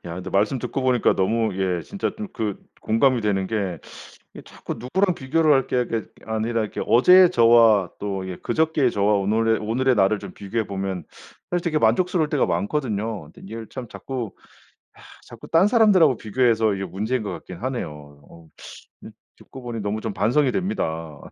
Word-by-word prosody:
야 85 Hz, -1 st, -6 dB
근데 90 Hz, +1 st, -7 dB
말씀 105 Hz, +8 st, +1 dB
듣고 130 Hz, +3 st, -3 dB
보니까 125 Hz, -2 st, +2 dB
너무 110 Hz, +4 st, +1 dB
예 95 Hz, -3 st, -1 dB
진짜 200 Hz, -, -3 dB
좀 215 Hz, -, -5 dB
그 105 Hz, -3 st, -3 dB, 0.2 s
공감이 125 Hz, +3 st, +2 dB
되는 100 Hz, -3 st, 0 dB
게 95 Hz, -5 st, -2 dB, 0.5 s
이 -, -, -11 dB
자꾸 -, -, -8 dB
누구랑 180 Hz, -, 0 dB
비교를 155 Hz, +3 st, +2 dB
할 135 Hz, -2 st, +3 dB
게 125 Hz, -1 st, 0 dB
게 115 Hz, -1 st, -2 dB, 0.2 s
아니라 110 Hz, +1 st, -1 dB
이렇게 105 Hz, -, -5 dB
어제의 180 Hz, +8 st, +6 dB
저와 115 Hz, -, +5 dB
또 95 Hz, -2 st, -4 dB
예 90 Hz, -, -5 dB
그저께의 155 Hz, -, 0 dB
저와 105 Hz, +1 st, +2 dB
오늘의 110 Hz, +3 st, +1 dB
오늘의 125 Hz, +4 st, 0 dB
나를 105 Hz, +1 st, +3 dB
좀 -, -, -9 dB
비교해보면 95 Hz, -4 st, -4 dB, 0.5 s
사실 175 Hz, -1 st, -1 dB
되게 155 Hz, -3 st, +1 dB
만족스러울 160 Hz, +8 st, +2 dB
때가 150 Hz, -3 st, +1 dB
많거든요. 110 Hz, -, -2 dB
근데 -, -, -17 dB
이걸 110 Hz, +2 st, -8 dB
참 130 Hz, -3 st, -8 dB
자꾸 125 Hz, -4 st, -6 dB, 0.7 s
야 -, -, -16 dB, 0.3 s
자꾸 -, -, -12 dB
딴 165 Hz, +5 st, +4 dB
사람들하고 200 Hz, -, +4 dB
비교해서 110 Hz, -1 st, +1 dB
이게 95 Hz, 0 st, -4 dB
문제인 110 Hz, +7 st, -2 dB
것 105 Hz, -, -4 dB
같긴 90 Hz, -, -9 dB
하네요. 75 Hz, -, -6 dB
어 85 Hz, -1 st, -16 dB, 0.5 s
음 -, -, -10 dB, 0.3 s
듣고 130 Hz, -, -13 dB
보니 120 Hz, -2 st, -5 dB
너무 105 Hz, +1 st, -3 dB
좀 110 Hz, -, -3 dB
반성이 125 Hz, +7 st, +1 dB
됩니다. 80 Hz, -, -3 dB
115 Hz, 365 characters per minute, -23 LUFS, 100-130 Hz, 0.7 s, 어제의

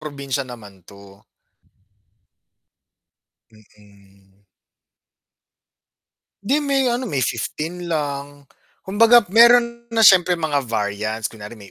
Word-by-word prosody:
probinsya 140 Hz, -2 st, -5 dB
naman 105 Hz, -7 st, -14 dB
to. 100 Hz, +1 st, -17 dB, 2.3 s
Mm. 100 Hz, -2 st, -25 dB, 2.0 s
'Di 265 Hz, +8 st, 0 dB
may 275 Hz, -2 st, 0 dB
ano, 240 Hz, +2 st, -2 dB
may 145 Hz, -, -3 dB
15 155 Hz, +9 st, -4 dB
lang 145 Hz, -3 st, -5 dB, 0.3 s
Kumbaga 230 Hz, +5 st, +4 dB
meron 235 Hz, +2 st, +4 dB
na 225 Hz, -, 0 dB
siyempre 185 Hz, -4 st, +5 dB
mga 145 Hz, -4 st, -1 dB
variants, 110 Hz, 0 st, -3 dB
kunwari 105 Hz, -1 st, -12 dB
may 100 Hz, -4 st, -15 dB
140 Hz, 90 wpm, -20 LUFS, -, 2.3 s, siyempre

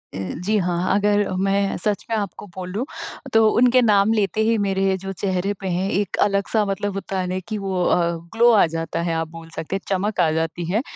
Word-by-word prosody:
ए, 95 Hz, -1 st, -4 dB
जी 215 Hz, +2 st, +2 dB
हाँ। 180 Hz, 0 st, 0 dB
अगर 205 Hz, 0 st, +2 dB
अ, 185 Hz, -, -3 dB
मैं 195 Hz, +1 st, +1 dB
सच 205 Hz, +1 st, -1 dB
में 225 Hz, -, 0 dB
आपको 205 Hz, 0 st, -5 dB
बोलूँ, 190 Hz, +6 st, -4 dB, 0.5 s
तो 225 Hz, 0 st, +6 dB
उनके 250 Hz, +3 st, +4 dB
नाम 210 Hz, -2 st, +4 dB
लेते 215 Hz, 0 st, 0 dB
ही 230 Hz, -, +3 dB
मेरे 195 Hz, -1 st, +1 dB
जो 195 Hz, +1 st, -6 dB
चेहरे 190 Hz, +1 st, -1 dB
पे 195 Hz, -, -5 dB
है 185 Hz, +2 st, -1 dB
एक 200 Hz, -2 st, -1 dB
अलग-सा 205 Hz, +2 st, +1 dB
मतलब 200 Hz, 0 st, -2 dB
होता 195 Hz, -1 st, -4 dB
है 185 Hz, -, -1 dB
ना, 185 Hz, +1 st, -2 dB
कि 215 Hz, +4 st, -5 dB
वो 190 Hz, -3 st, -1 dB
अ, -, -, +3 dB, 0.4 s
ग्लो 235 Hz, +1 st, +6 dB
आ 215 Hz, -5 st, +6 dB
जाता 165 Hz, 0 st, -2 dB
है, 170 Hz, -1 st, -1 dB
आप 165 Hz, 0 st, -1 dB
बोल 165 Hz, 0 st, -11 dB
सकते 165 Hz, +4 st, -3 dB
चमक 200 Hz, +2 st, -1 dB
आ 170 Hz, -3 st, +4 dB
जाती 165 Hz, +2 st, -2 dB
है। 215 Hz, +4 st, +2 dB
195 Hz, 220 wpm, -22 LUFS, 180-205 Hz, 0.5 s, तो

